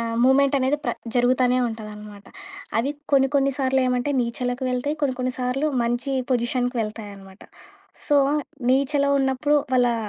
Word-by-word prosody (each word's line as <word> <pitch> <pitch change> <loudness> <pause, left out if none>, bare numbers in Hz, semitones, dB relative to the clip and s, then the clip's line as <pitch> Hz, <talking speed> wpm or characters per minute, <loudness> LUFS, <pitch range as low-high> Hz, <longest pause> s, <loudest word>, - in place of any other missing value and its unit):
ఆహ్, 230 0 -3
మూమెంట్ 275 +2 +4
అనేది 265 +2 +1
ప్ర 240 - 0 0.2
జరుగుతనే 250 0 +3
ఉంటదనమాట. 210 -2 -9 0.5
అవి 265 +5 0 0.2
కొన్ని 270 -1 +4
కొన్ని 275 0 +3
సార్లు 265 -1 +2
ఏమంటే, 250 +2 0
నీచలకు 245 +2 -2
వెళ్తాయి. 270 +5 -2
కొన్ని 265 -3 +1
కొన్ని 255 0 -1
సార్లు 255 +4 0
మంచి 240 +3 -1 0.2
పొజిషన్‌కి 245 +1 0
వెళ్తాయి 215 -1 -6
అనమాట. 195 0 -15 0.6
సో, 290 - +3 0.5
నీచలో 280 +2 +2
ఉన్నప్పుడు 270 +2 +1 0.2
వాళ్ళా 245 -1 +3
255 Hz, 145 wpm, -23 LUFS, 235-270 Hz, 0.6 s, మూమెంట్